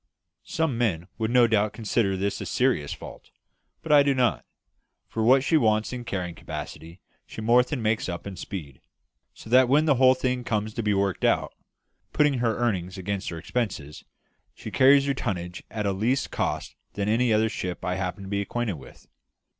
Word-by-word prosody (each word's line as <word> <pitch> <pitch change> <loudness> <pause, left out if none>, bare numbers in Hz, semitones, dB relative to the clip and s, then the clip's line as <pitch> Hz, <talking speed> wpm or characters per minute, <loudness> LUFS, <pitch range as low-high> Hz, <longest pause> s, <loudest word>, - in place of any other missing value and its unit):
Some 155 -7 -1
men 90 -8 0
would 110 0 0
no 125 0 +5
doubt 110 -2 +1
consider 105 -3 0
this 100 +2 -2
a - - -5
serious 125 - +1
fault; - - -9 0.5
but 160 - -3
I 145 -1 +8
do 140 -1 +2
not, 125 -2 +1 0.6
for 110 - -4
what 130 +4 +5
she 160 - +3
wants 110 -3 +1
in 120 -1 -6
carrying 90 -5 -3
capacity 85 +1 -8 0.3
she - - -9
more 120 +3 +5
than 125 -1 -4
makes 110 -2 0
up 85 -1 -5
in 100 -1 -6
speed; 75 -10 -8 0.5
so - - -13
that 130 0 +6
when 150 +4 +4
the 145 -5 +3
whole 130 0 +7
thing 125 -1 -1
comes 110 -2 -2
to 115 - -3
be 105 -2 +1
worked 100 -1 -1
out, - - +1 0.6
putting 145 -4 +2
her 115 -2 0
earnings 95 -6 -1
against 95 +1 -3
her 85 - -6
expenses, 85 - -4 0.5
she - - -8
carries 135 +1 +5
her 140 - +1
tonnage 90 -8 -4
at 110 -1 -4
a 100 - +1
less 115 +8 0
cost - - -3 0.2
than 100 0 -2
any 115 +2 +2
other 110 +1 +3
ship 90 -4 -5
I 90 - 0
happen 95 +1 -4
to - - -8
be 100 0 -1
acquainted 110 -3 -3
with." 65 - -15
110 Hz, 195 wpm, -26 LUFS, 95-125 Hz, 0.6 s, I